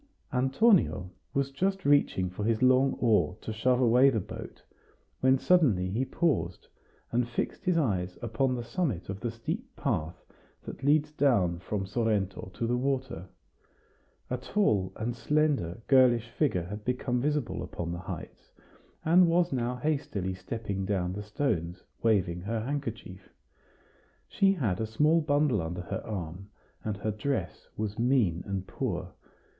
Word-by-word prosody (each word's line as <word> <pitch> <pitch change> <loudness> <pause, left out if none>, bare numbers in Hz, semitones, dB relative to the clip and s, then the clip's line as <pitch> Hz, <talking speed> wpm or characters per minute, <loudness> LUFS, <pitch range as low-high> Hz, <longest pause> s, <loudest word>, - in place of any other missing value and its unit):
Antonio 135 - +3 0.2
was 140 0 0
just 190 +7 -1
reaching 140 -10 +3
for 90 +3 -5
his 115 +2 +1
long 130 +1 +5
oar 105 -5 +2
to 110 - -5
shove 125 +3 +2
away 125 +2 +6
the 115 -5 0
boat, 90 - -9 0.6
when 130 +1 +4
suddenly 125 - +3
he 115 +6 0
paused, 95 - -1 0.4
and 120 0 +1
fixed 120 - -3
his 180 -2 +2
eyes 95 - 0
upon 120 +3 0
the 120 - -4
summit 120 - -2
of 95 0 -4
the 120 - -2
steep 115 +1 -5
path 80 +3 -2 0.4
that - - -8
leads 150 +1 +3
down 110 - +2
from 95 +2 -3
Sorrento 105 -3 -1
to 115 - -2
the 120 +1 +1
water. 130 -8 -2 1.0
A 130 - 0
tall 110 - +1
and 115 +2 -3
slender 135 - 0
girlish 125 -4 +4
figure 115 - +1
had 105 +4 -7
become 125 0 -1
visible 140 -11 -1
upon 85 -1 -5
the 85 - -4
heights, 85 - -8 0.6
and 175 +2 +6
was 170 -1 +2
now 125 -1 -1
hastily 125 -10 -2
stepping 100 0 -4
down 95 -2 -1
the 105 - -5
stones, 100 - -2 0.2
waving 95 -6 +2
her 110 +4 -2
handkerchief 115 -7 -5 1.0
She 195 0 +3
had 110 - -1
a 110 - -1
small 150 +9 +3
bundle 145 - +2
under 85 +2 -4
her 90 - -4
arm, 95 -1 -6 0.3
and 105 -2 -3
her 110 +2 -2
dress 135 +7 -3
was 105 0 -3
mean 115 -9 +2
and 100 -1 -3
poor. - - -4
115 Hz, 150 wpm, -29 LUFS, 95-135 Hz, 1.0 s, away